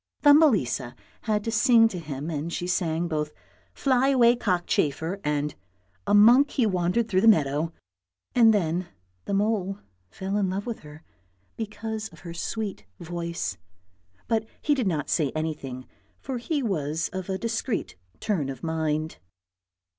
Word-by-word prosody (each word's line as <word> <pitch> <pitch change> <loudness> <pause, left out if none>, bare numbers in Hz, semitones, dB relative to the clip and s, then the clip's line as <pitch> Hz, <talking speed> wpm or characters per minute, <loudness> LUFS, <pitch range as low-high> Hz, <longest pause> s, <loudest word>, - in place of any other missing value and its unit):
Thumbelisa 205 - +4 0.3
had 210 -2 +1
to 225 - -2
sing 230 0 +5
to 185 - -5
him 150 0 -5
and 155 +2 -3
she 175 - -3
sang 175 -2 0
both 150 -2 -2 0.2
" 90 - -34
Fly 260 -1 +2
away 245 -3 +5
cockchafer 175 - 0
" - - -33
and 150 0 -1 0.3
" 90 0 -40
A - - +4
monk, 240 +7 +7
he 250 - +1
wandered 185 +3 +1
through 190 -4 +2
the 225 - +4
meadow," 155 -5 +3 0.6
then 190 -7 +3 0.4
the 200 - -1
mole 200 -2 0 0.3
fell 190 - -3
in 195 -2 +1
love 195 +2 -3
with 235 -2 -4
her 150 +1 -13 0.5
because 220 0 -4
of - - -17
her 170 -2 -7
sweet 200 - -4
voice, 170 - -4 0.7
but 220 -1 0
he 295 - +2
did 255 -7 0
not 155 -5 -1
say 150 -6 +1
anything, 140 -5 -4 0.3
for 260 -3 -4
he 285 +3 -1
was 160 -6 -1
of 185 0 -5
a 190 - -1
discreet 230 +1 -2 0.2
turn 160 -10 -1
of 130 -2 -7
mind. 160 -1 -2
185 Hz, 155 wpm, -26 LUFS, 155-225 Hz, 0.7 s, monk